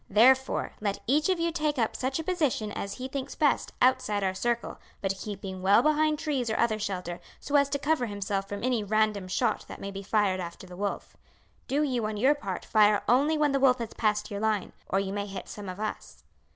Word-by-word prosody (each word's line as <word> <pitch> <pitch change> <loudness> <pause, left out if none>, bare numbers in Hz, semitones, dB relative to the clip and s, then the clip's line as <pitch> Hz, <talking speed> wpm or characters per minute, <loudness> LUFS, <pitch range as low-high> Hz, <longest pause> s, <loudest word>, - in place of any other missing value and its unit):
Therefore, 260 +6 +4
let 200 -2 -1
each 300 +7 +2
of 370 -2 +2
you 335 0 +1
take 305 -3 -1
up 225 -3 0
such 260 +1 -1
a 320 - -3
position 300 - 0
as 200 -1 -4
he 255 0 -5
thinks 265 0 -5
best 295 -3 +1
outside 250 -6 +2
our 190 -1 +1
circle, 235 +4 -2 0.2
but 195 -1 -1
keeping 195 -2 -6
well 200 +5 +5
behind 305 0 +3
trees 275 -6 -1
or 220 - 0
other 220 -2 +2
shelter, 180 -4 -4 0.2
so 290 - -3
as 280 -1 +5
to 285 - 0
cover 285 -3 0
himself 200 -1 -3
from 205 +1 -5
any 245 -4 +1
random 210 -2 +1
shot 215 +4 0
that - - -9
may 200 - -5
be 195 0 -6
fired 200 -2 +1
after 170 +1 -7
the 180 -1 -11
wolf. 200 +2 -4 0.5
Do 285 +3 +1
you, 250 -6 0
on 215 -1 -4
your 260 +7 +4
part, 195 -11 -5
fire 210 -1 +4
only 280 +7 +3
when 300 -1 +3
the 275 - +1
wolf 260 -2 +5
has 230 -2 -5
passed 210 -1 0
your 200 - -3
line, 215 -3 0 0.2
or 195 - +2
you 195 0 -2
may 205 0 -3
hit 195 -2 -7
some 205 -2 -7
of 185 +2 -7
us." 215 0 -5
220 Hz, 225 wpm, -28 LUFS, 200-270 Hz, 0.5 s, well